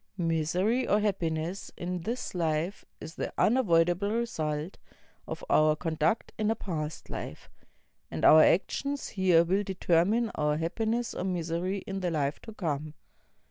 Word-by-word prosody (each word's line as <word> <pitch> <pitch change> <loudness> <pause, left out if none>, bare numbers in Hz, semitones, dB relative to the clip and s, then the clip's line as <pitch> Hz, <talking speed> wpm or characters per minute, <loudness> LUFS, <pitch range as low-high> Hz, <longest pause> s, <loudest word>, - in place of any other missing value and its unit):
IMisery 175 +9 +1
or 210 - +5
happiness 175 -3 -2
in 180 +1 -3
this 235 +8 -4
life 165 +2 -1 0.2
is 160 - -8
the - - -4
unavoidable 180 -5 +3
result 160 -8 -2 0.5
of - - -6
our 155 0 +4
conduct 160 +5 -1
in 215 0 +1
a 225 - +2
past 160 -7 -5
Hf - - -5
e; - - -25 0.4
and - - -2
our 155 - +9
actions 280 - +1
here 185 -4 +4
will 190 +4 +1
determine 195 +4 +1
our 150 0 0
happiness 225 +8 -1
or - - -4
miser\ 170 -2 -2
in 195 0 -3
the 180 -2 -1
Hfe 145 -3 -1
to 225 - -10
come. 155 -4 -3
175 Hz, 145 wpm, -29 LUFS, 160-205 Hz, 0.5 s, our